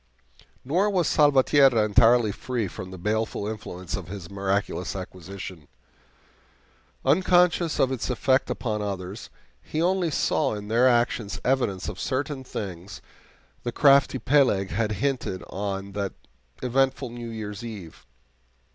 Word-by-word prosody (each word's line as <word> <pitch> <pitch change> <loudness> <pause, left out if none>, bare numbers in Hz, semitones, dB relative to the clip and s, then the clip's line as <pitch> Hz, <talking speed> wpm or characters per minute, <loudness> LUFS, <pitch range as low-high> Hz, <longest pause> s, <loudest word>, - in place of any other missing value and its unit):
Nor 180 +10 +2
was 180 -6 +1
Salvatierra 135 -5 +5
entirely 115 +1 +4
free 120 0 -3
from 90 +1 -8
the 95 - -9
baleful 105 +2 -1
influence 95 -5 -5
of 95 -4 -6
his 95 -1 -8
miraculous 100 -1 -2
acquisition. 95 -3 -8 1.4
Unconscious 175 +2 +3
of 130 - +3
its 130 -1 -3
effect 130 +1 +2
upon 105 -3 -2
others, 100 0 -5 0.3
he 155 - -4
only 180 0 +2
saw 140 -3 +1
in 105 0 -7
their 120 +3 +4
actions 120 -3 0
evidence 125 -8 0
of 100 -2 -6
certain 135 0 -2
things 95 -6 -7 0.6
that - - -38
the 120 - -2
crafty 140 +1 +5
Peleg 125 -9 +2
had 110 0 0
hinted 130 -7 -2
on 100 0 -4
that 100 -1 -3 0.5
eventful 130 0 +1
New 120 -1 -7
Year's 105 -2 -6
eve. 105 -8 -9
115 Hz, 130 wpm, -25 LUFS, 100-135 Hz, 1.4 s, Salvatierra